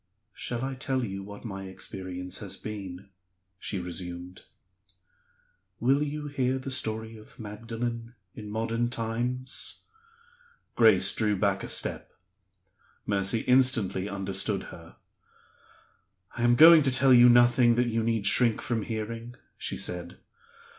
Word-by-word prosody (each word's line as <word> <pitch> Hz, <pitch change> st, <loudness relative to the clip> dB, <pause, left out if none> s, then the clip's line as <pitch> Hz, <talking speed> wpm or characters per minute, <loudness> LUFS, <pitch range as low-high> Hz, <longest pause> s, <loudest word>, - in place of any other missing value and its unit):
"Shall 120 Hz, 0 st, -4 dB
I 135 Hz, -, -4 dB
tell 130 Hz, -1 st, -2 dB
you 95 Hz, -2 st, -6 dB
what 100 Hz, +3 st, -11 dB
my 95 Hz, -3 st, -6 dB
experience 95 Hz, -1 st, -7 dB
has -, -, -5 dB
been?" 95 Hz, -3 st, -8 dB, 0.5 s
she 100 Hz, -, -3 dB
resumed. 90 Hz, 0 st, -7 dB, 1.3 s
"Will 135 Hz, +4 st, +2 dB
you 150 Hz, 0 st, -3 dB
hear 130 Hz, -3 st, -1 dB
the 130 Hz, +1 st, -6 dB
story 110 Hz, -2 st, -1 dB
of 110 Hz, -, -16 dB
Magdalen 115 Hz, +2 st, -6 dB, 0.2 s
in 105 Hz, -1 st, -9 dB
modern 115 Hz, +2 st, -1 dB
times?" 120 Hz, +3 st, -3 dB, 0.9 s
Grace 105 Hz, -4 st, +5 dB
drew 105 Hz, -2 st, +1 dB
back 100 Hz, 0 st, 0 dB
a -, -, -5 dB
step; -, -, -1 dB, 0.9 s
Mercy 100 Hz, +2 st, +1 dB
instantly 125 Hz, -7 st, +2 dB
understood 95 Hz, -1 st, -1 dB
her. -, -, -13 dB, 1.4 s
"I 120 Hz, -, -5 dB
am 120 Hz, 0 st, +4 dB
going 160 Hz, +3 st, +9 dB
to 135 Hz, -2 st, +1 dB
tell 130 Hz, +1 st, +4 dB
you 120 Hz, 0 st, +8 dB
nothing 120 Hz, 0 st, +5 dB
that 120 Hz, +1 st, +2 dB
you 115 Hz, 0 st, 0 dB
need 110 Hz, -2 st, -1 dB
shrink 115 Hz, +2 st, +3 dB
from 120 Hz, -3 st, -2 dB
hearing," 115 Hz, +2 st, -5 dB, 0.2 s
she -, -, -4 dB
said. 90 Hz, 0 st, -2 dB
115 Hz, 130 wpm, -27 LUFS, 100-125 Hz, 1.4 s, going